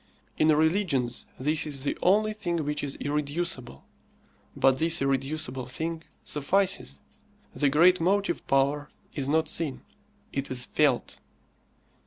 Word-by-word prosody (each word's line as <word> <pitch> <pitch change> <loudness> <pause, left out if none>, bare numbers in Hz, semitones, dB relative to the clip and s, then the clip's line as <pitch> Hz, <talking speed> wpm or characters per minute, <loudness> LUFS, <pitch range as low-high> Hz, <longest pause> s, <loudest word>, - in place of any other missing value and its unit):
In 155 - +2
religions 155 -5 +1
this 150 +4 +1
is 140 -3 -3
the 145 - -1
only 215 +4 +3
thing 170 -7 -2
which 150 0 -2
is 140 -1 -3
irreducible; 145 - -3 0.7
but 130 -1 +3
this 165 +1 +4
irreducible 135 -1 -1
thing 160 +5 -4 0.2
suffices. 150 - 0 0.5
The 145 - +2
great 170 +5 +5
motive 200 +4 0
power 140 +2 +1 0.2
is 140 -2 -3
not 160 +2 +2
seen; 155 -4 -1 0.5
it 135 0 -2
is 125 -1 -1
felt. - - +1
150 Hz, 125 wpm, -27 LUFS, 135-170 Hz, 0.7 s, great